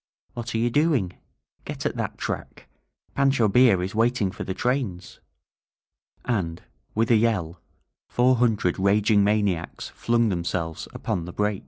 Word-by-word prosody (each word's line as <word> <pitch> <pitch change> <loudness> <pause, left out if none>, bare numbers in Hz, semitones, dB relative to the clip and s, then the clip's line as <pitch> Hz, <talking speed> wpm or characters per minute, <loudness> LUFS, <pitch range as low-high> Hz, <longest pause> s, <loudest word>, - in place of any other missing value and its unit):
"What 120 -1 -5
are - - +2
you 120 +1 +1
doing? 145 - +2 0.5
Get - - -6
at - - -1
that - - -3
track! - - -5 0.5
Pancho 135 -5 +3
Villa 110 -3 +5
is 95 - -4
waiting 115 -3 +1
for - - -6
the 95 - -4
trains!" 120 -9 -2 1.1
And, 90 -8 -2 0.3
with 115 +2 +2
a 115 - +6
yell, 95 -7 0 0.5
four 125 +1 +3
hundred 110 -7 +1
raging 100 +1 +3
maniacs 100 -5 0
flung 115 -1 +1
themselves 85 -3 -3
upon 85 -3 -3
the 90 - -7
break. 105 -1 0
105 Hz, 145 wpm, -25 LUFS, 90-120 Hz, 1.1 s, a